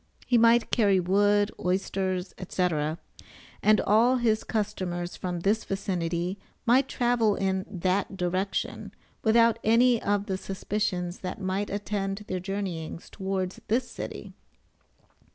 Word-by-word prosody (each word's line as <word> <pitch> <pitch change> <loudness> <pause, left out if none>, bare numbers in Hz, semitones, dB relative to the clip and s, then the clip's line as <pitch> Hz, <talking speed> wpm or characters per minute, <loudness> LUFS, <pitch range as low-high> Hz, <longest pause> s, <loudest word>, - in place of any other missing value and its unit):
He 245 - +2
might 230 0 +5
carry 200 -5 +4
wood, 205 +3 +3
oysters, 185 0 -1 0.2
&c., 180 -1 +1 0.9
and 215 0 +4
all 230 +5 +4
his 225 -3 +1
customers 185 -5 -3
from 175 -2 -4
this 210 +4 +1
vicinity 180 -1 -2 0.3
might 255 +3 +4
travel 240 -5 +2
in 190 0 -1
that 190 +1 -1
direction 185 +2 -2 0.3
without 230 0 +4
any 235 +1 +4
of 205 0 0
the 190 -1 -3
suspicions 190 -2 -2
that 185 - -5
might 195 +1 -2
attend 205 0 -3
their 185 - -2
journeyings 180 -4 -5
towards 190 -2 -3
this 240 +3 0
city. - - -7
195 Hz, 120 wpm, -27 LUFS, 185-215 Hz, 0.9 s, might